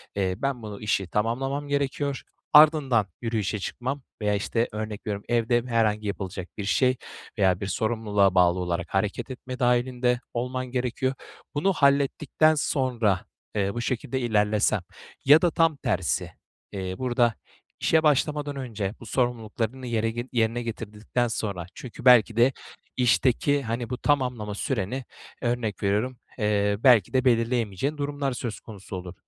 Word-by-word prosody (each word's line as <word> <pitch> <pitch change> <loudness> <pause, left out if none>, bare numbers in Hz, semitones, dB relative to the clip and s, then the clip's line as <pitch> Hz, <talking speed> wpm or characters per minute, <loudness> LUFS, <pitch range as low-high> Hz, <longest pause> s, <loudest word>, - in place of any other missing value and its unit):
eee, 95 -2 0
ben 135 -3 -2
bunu, 105 -1 -7
işi 100 -3 0
tamamlamam 135 +8 -1
gerekiyor, 140 -1 -1 0.3
ardından 145 -8 +6
yürüyüşe 110 -3 -1
çıkmam 130 +8 -4 0.2
veya, 105 -1 +1
işte, 115 +3 0
örnek 105 0 -5
veriyorum, 100 -1 -3
evde 120 0 +2
herhangi 110 -3 +1
yapılacak 95 -2 -5
bir 105 - -4
şey 130 +5 +2 0.4
veya 95 -2 +3
bir 100 - -2
sorumluluğa 105 -2 +1
bağlı 90 0 +4
olarak 85 -1 -2
hareket 100 +6 -1
etme 125 0 -7
dâhilinde 125 0 +2
olman 125 +1 -2
gerekiyor. 130 +1 -1 0.4
Bunu 190 +7 +2
hallettikten 140 +1 +3
sonra, 120 - 0 0.3
eee, 100 -1 0
bu 120 - -3
şekilde 130 +2 -2
ilerlesen 105 -3 +2 0.4
ya 150 +4 +8
da 175 - +3
tam 165 0 +3
tersi, 90 - -1 0.4
eee, 95 -2 -4
burada 120 -3 +1 0.5
işe 160 -1 +3
başlamadan 150 0 +1
önce 110 -7 -4
bu - - -11
sorumluluklarını 120 +1 -2
yere 115 +1 -1
yerine 115 0 +1
getirdikten 115 +1 -3
sonra 100 -6 -3
Çünkü 125 -1 -10
belki 120 -3 +6
de 125 +3 +5 0.4
işteki, 130 +3 +2
hani, 115 0 -3
bu 125 - -3
tamamlama 125 -8 0
süreni, 125 +2 -2 0.4
örnek 120 -5 -2
veriyorum, 105 +6 0 0.2
eee, 105 -1 +2
belki 120 -7 +5
de 130 0 +2
belirleyemeyeceğin 115 +2 +1
durumlar 145 -2 -2
söz 120 -4 -5
konusu 100 -3 -9
olur. 90 -1 -7
120 Hz, 140 wpm, -26 LUFS, 105-130 Hz, 0.5 s, ya